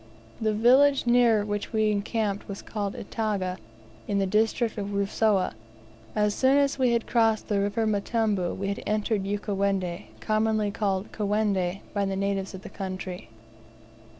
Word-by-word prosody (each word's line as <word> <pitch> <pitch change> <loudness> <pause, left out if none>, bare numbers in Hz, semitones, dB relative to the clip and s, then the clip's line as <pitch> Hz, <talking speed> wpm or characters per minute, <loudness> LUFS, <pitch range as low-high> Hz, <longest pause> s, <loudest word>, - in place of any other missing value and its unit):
The 215 -1 +1
village 265 +5 +5
near 235 -3 +4
which 205 -1 -3
we 215 -1 +2
encamped 205 0 -1
was 200 -1 -7
called 205 -2 -4
Itaga, 200 -4 -2 0.5
in 205 - 0
the 195 - +2
district 220 +3 +1
of 200 0 -4
Rusawa. 200 0 +1 0.6
As 210 -1 +2
soon 265 +4 +3
as 280 -1 +2
we 250 -2 +3
had 235 -1 0
crossed 225 -2 +2
the 205 -2 +2
River 205 +3 0
Mtambu 210 -3 0
we 195 +1 -2
had 200 - -3
entered 210 -1 0
Ukawendi, 200 -2 -1
commonly 215 -1 +1
called 200 -1 -1
"Kawendi" 200 -3 0
by 200 -1 0
the 195 0 -2
natives 195 0 -2
of 190 - -10
the - - -8
country. 185 - -6
205 Hz, 150 wpm, -26 LUFS, 195-220 Hz, 0.6 s, village